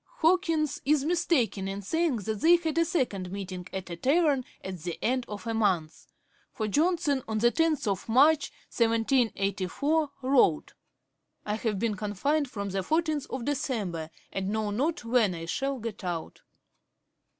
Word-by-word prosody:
Hawkins 325 -3 +2
is 290 0 +2
mistaken 305 - +1
in 195 +1 -5
saying 325 - +1
that 215 0 -4
they 340 +2 +7
had 330 -2 -1
a 335 - +4
second 225 - -1
meeting 185 -2 -6
at 190 -2 -6
a - - -3
tavern 280 - +2 0.2
at 190 -2 -6
the 170 +1 -5
end 255 +1 0
of 210 +1 -7
a 230 - -2
month; 185 -8 0 0.4
for 215 -3 -3
Johnson, 305 - +1
on 220 - -3
March 240 +2 +3
10, 325 -1 +3 1.1
1784, 230 - +1
wrote: 255 - +3 0.7
'I 210 - -1
have 215 -1 -1
been 225 +2 0
confined 235 +8 -1
from 200 -4 -4
the 195 0 -1
fourteenth 310 - 0
of 255 -3 -4
December, 205 - -2 0.2
and 195 0 -2
know 215 0 -1
not 270 +5 -1
when 230 -6 +2
I 165 0 -6
shall 270 +10 -2
get 225 -4 -6
out.' 175 -3 -4
230 Hz, 150 wpm, -28 LUFS, 195-300 Hz, 1.1 s, they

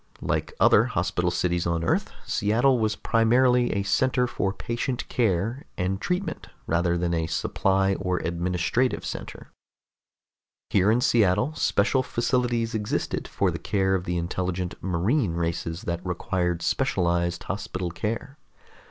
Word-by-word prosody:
Like - - -2
other - - +6
hospital 90 0 0
cities 85 0 0
on 85 -1 0
Earth, - - +1 0.2
Seattle 120 +5 +2
was 110 -1 +1
primarily 125 +2 +3
a 100 - 0
center 125 +5 +2
for 100 -5 -1
patient 120 +4 -3
care 115 +3 0
and 95 +2 -1
treatment 180 +2 -2 0.2
rather 85 +1 +1
than 85 0 0
a 80 -1 0
supply 95 +5 +1
or 90 -1 -1
administrative 90 +9 0
center. - - -7 1.2
Here 100 0 +4
in 115 +3 +3
Seattle 105 +4 +3
special 130 -2 +2
facilities 120 -2 0
existed 105 -2 -2
for - - 0
the - - -5
care 95 -1 0
of 90 -2 0
the 90 0 -1
intelligent 90 +1 -2
marine 95 - +1
races 85 0 -3
that 85 +1 -3
required 90 -1 -1
specialized 85 -9 0
hospital 95 -3 -4
care. 115 - -4
95 Hz, 135 wpm, -25 LUFS, 85-120 Hz, 1.2 s, other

